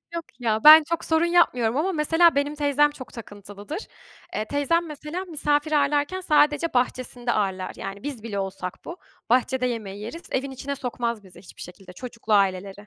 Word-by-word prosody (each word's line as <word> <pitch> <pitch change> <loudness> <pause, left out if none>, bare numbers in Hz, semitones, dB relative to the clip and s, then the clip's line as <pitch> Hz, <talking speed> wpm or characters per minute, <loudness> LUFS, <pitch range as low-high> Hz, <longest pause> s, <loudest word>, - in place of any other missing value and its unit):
Yok 335 - -4
ya! 220 -2 -1
Ben 310 +1 +10
çok 335 +2 -3
sorun 320 +1 +2
yapmıyorum 255 -9 +2
ama 355 +6 +1
mesela 325 +1 +3
benim 285 +1 0
teyzem 295 0 +2
çok 260 -3 -11
takıntılıdır. 205 - -9 0.5
Eee, 215 - -2
teyzem 285 +6 0
mesela 305 +5 -6
misafir 300 -2 -1
ağırlarken 290 +5 +1
sadece 300 -1 +2
bahçesinde 245 -1 -1
ağırlar. 190 -3 -1
Yani 195 +3 -7
biz 270 -7 -6
bile 205 -3 -4
olsak 190 -2 -6
bu; 340 - -7 0.3
bahçede 255 +1 +2
yemeği 210 -4 -4
yeriz. 330 +11 -7
Evin 270 +1 -2
içine 275 +2 -5
sokmaz 235 -4 -4
bizi 180 -2 -16
hiçbir 180 - -14
şekilde. 180 +1 -11
Çocuklu 230 -1 -5
aileleri. 195 -1 +2
260 Hz, 170 wpm, -24 LUFS, 215-300 Hz, 0.5 s, Ben